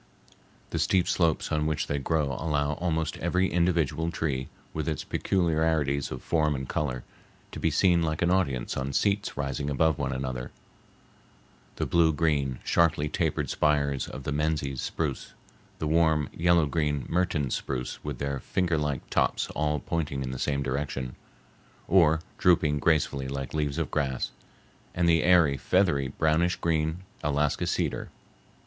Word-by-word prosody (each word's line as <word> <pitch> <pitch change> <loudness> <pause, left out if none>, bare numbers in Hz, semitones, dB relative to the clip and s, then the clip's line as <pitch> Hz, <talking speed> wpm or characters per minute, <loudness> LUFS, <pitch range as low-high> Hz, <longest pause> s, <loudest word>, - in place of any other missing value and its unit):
The - - -1
steep 95 -2 +2
slopes 85 -3 +1
on 75 0 +1
which 75 -1 -1
they 70 - -2
grow 75 0 0
allow 75 -2 0
almost 80 -1 -1
every 90 +2 +1
individual 85 -3 +1
tree, 70 -6 -2 0.3
with 80 0 -2
its 75 - -2
peculiarities 80 -6 +1
of - - -7
form 75 -3 +1
and 65 -1 -4
color, 65 -5 -2 0.5
to - - -7
be 80 - +2
seen 85 +2 +3
like 80 0 0
an 85 - +2
audience 70 -10 0
on 65 +1 -3
seats 100 0 0
rising 70 0 -2
above 75 +1 +2
one - - -1
another—the 65 -1 -9
blue 85 -2 +4
green, 70 -4 +1
sharply 80 -3 +2
tapered - - -1
spires 70 -3 +1
of 65 - -8
the 75 - -3
Menzies 75 -3 -1
spruce, 75 -5 -3 0.4
the - - -3
warm 80 -2 +2
yellow 85 -1 +3
green 75 -3 -1
Mertens 80 -6 0
spruce 65 -2 -4
with 75 -3 -4
their 70 0 -2
finger 85 +2 0
like 75 -3 -2
tops - - +1
all 75 0 0
pointing 70 -2 -2
in 65 - -4
the 65 - -5
same 70 -1 0
direction, 65 -1 -3 0.7
or 80 -3 +4 0.2
drooping 80 -5 +3
gracefully 70 -3 +1
like 70 -1 -5
leaves 75 -2 -1
of 80 -5 -2
grass, 65 -4 -1 0.6
and 85 0 +2
the 80 -1 +4
airy, 85 -6 +4
feathery, 85 -5 +2
brownish 80 +5 +1
green 80 +1 -1 0.2
Alaska 75 0 0
cedar. - - -1
75 Hz, 150 wpm, -27 LUFS, 70-80 Hz, 0.7 s, blue